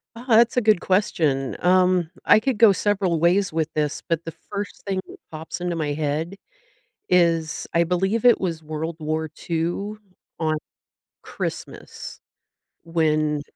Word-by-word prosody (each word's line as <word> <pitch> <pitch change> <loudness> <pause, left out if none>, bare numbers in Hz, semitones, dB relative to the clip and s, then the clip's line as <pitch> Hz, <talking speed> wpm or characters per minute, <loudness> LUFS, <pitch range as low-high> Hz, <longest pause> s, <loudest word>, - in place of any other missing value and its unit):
Ah, 235 +2 -10
that's 235 0 +4
a - - +5
good 215 -5 +3
question, 155 -8 +1
um, 180 -2 +3 0.2
I - - +7
could 250 +1 -1
go 225 -1 +7
several 195 -4 0
ways 180 +3 +2
with 160 -1 -1
this, 150 -1 -1
but 165 0 -1
the 165 - -4 0.2
first 200 0 -5
thing 190 -1 -1
that - - -12
pops 160 +2 -7
into 175 -1 -2
my 150 -3 -1
head 155 +4 -2 0.7
is, 165 -3 +2
I 170 - +4
believe 190 +6 0
it 245 -1 +6
was 165 -4 -3
World 155 +2 -4
War 155 +1 -2 0.2
II 175 +6 -1 0.4
on 155 -1 0 0.7
Christmas - - -7 0.6
when 155 -3 +1
170 Hz, 145 wpm, -23 LUFS, 155-195 Hz, 0.7 s, I